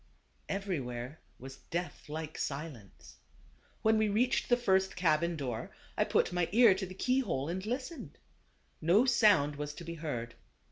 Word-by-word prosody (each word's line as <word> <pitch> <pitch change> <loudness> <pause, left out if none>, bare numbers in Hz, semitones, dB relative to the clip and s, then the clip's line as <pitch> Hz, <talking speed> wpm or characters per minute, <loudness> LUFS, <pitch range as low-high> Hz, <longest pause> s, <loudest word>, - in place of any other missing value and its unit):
Everywhere 145 -9 -3 0.2
was 135 +1 -10
death 175 -2 -4
like 155 0 -5
silence. 140 -8 -6 0.7
When 220 0 +4
we 215 -1 +2
reached 240 +5 +1
the 245 - +5
first 190 -5 +2
cabin 170 -1 +2
door, 125 -7 -4 0.3
I - - +2
put - - +1
my 175 -2 0
ear 230 -1 +7
to 190 0 -4
the 185 - -10
key 255 +7 +1
hole 155 - -1
and 185 +3 -3
listened. 260 +7 -5 0.6
No 180 +10 +4
sound 205 - +4
was 150 0 -5
to - - -8
be 170 0 -6
heard. 135 -8 -4
170 Hz, 155 wpm, -32 LUFS, 145-205 Hz, 0.7 s, ear